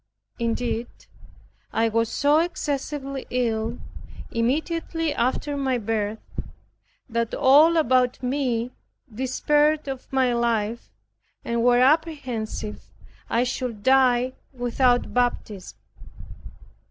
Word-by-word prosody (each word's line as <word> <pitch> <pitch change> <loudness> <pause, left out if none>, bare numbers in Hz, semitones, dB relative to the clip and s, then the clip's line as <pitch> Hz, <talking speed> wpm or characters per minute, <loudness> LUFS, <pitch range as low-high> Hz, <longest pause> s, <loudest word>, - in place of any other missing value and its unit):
Indeed, 235 0 -1 0.8
I 230 - +2
was 230 0 +1
so 290 +2 +3
excessively 285 -4 -3
ill, 230 -1 -1 0.5
immediately 320 +6 -1
after 285 +3 -1
my 265 -2 0
birth, 220 -1 -2 0.9
that 230 -2 -2
all 305 +5 +6
about 255 -4 +2
me 250 -2 -1 0.4
despaired 295 +5 +1
of 265 -2 -6
my 260 -2 +2
life, 235 -1 -1 0.6
and 235 0 0
were 245 0 +5
apprehensive 260 -8 0 0.5
I 235 - +2
should 245 -4 -4
die 255 -1 +4 0.2
without 245 -1 +1
baptism. 240 -6 -2
250 Hz, 90 wpm, -24 LUFS, 230-275 Hz, 0.9 s, all